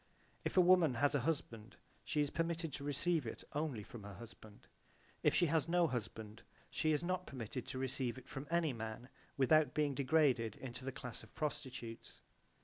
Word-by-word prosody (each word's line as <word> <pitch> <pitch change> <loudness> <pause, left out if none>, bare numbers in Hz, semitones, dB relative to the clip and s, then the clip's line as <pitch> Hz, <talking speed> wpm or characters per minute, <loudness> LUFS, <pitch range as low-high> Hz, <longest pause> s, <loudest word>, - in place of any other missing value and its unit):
If - - -2
a - - +10
woman 175 -6 +6
has 145 +6 +3
a 145 - +3
husband 115 -8 -4 0.3
she 150 -3 +1
is 145 - 0
permitted 165 -2 -1
to 140 - -5
receive 145 0 +1
it - - -6
only 145 -8 -1
from 120 +2 -9
her 100 -1 -8
husband: 110 -2 -12 0.6
if - - +4
she 175 - +5
has 160 -1 +2
no 175 0 +4
husband 110 -4 -4 0.3
she 155 - +1
is 150 0 +1
not 180 +1 -1
permitted 125 -1 -5
to - - -4
receive 130 -2 -1
it 130 - -11
from 135 +2 -6
any 165 -4 +2
man 115 +2 -6 0.3
without 145 +1 +4
being 150 -2 +2
degraded 130 -5 +3
into 130 -1 -7
the 135 - -2
class 125 -2 -7
of 110 - -16
prostitutes. 130 -7 -5
135 Hz, 185 wpm, -37 LUFS, 120-155 Hz, 0.6 s, a